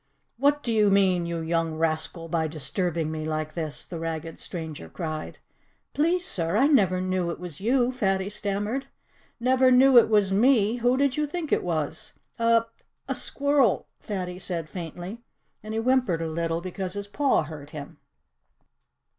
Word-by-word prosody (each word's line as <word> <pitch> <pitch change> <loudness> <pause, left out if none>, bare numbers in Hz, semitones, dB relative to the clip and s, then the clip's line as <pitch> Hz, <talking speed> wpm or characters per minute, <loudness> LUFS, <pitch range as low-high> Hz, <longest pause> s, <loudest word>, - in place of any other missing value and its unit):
"What 285 +3 +2
do 235 - -1
you 210 -2 +4
mean, 185 -3 +3
you 170 -1 -3
young 165 0 -1
rascal, 160 +1 -1
by 160 -1 0
disturbing 160 +1 -2
me 155 0 -4
like 155 0 -3
this?" 155 -4 -3
the 170 - -7
ragged 165 0 -5
stranger 160 - -6
cried. 155 - -5 0.6
"Please, 345 +4 +2
sir, 170 +2 0
I 265 - +5
never 195 - +4
knew 185 -1 -1
it 170 - -5
was 175 -2 -8
you," 245 +3 +2
Fatty 195 -6 0
stammered. 205 +5 -2 0.5
"Never 255 +1 +4
knew 255 0 +7
it 225 - +2
was 205 -3 +3
me! 225 +1 +3
Who 245 +2 +2
did 275 -1 +1
you 300 0 +1
think 315 0 -5
it - - +3
was?" 160 -3 -3 0.3
"A 230 0 +4 0.4
a - - 0
squirrel!" 280 -6 +1
Fatty 180 -3 -5
said 170 -4 -3
faintly. 180 +5 -7 0.4
And 215 +1 -6
he - - 0
whimpered 235 -9 +1
a - - -2
little, 165 +1 -1
because 185 +1 -4
his 200 0 -4
paw 270 - +1
hurt 150 -2 -9
him. 150 -2 -9
190 Hz, 165 wpm, -26 LUFS, 165-240 Hz, 0.6 s, knew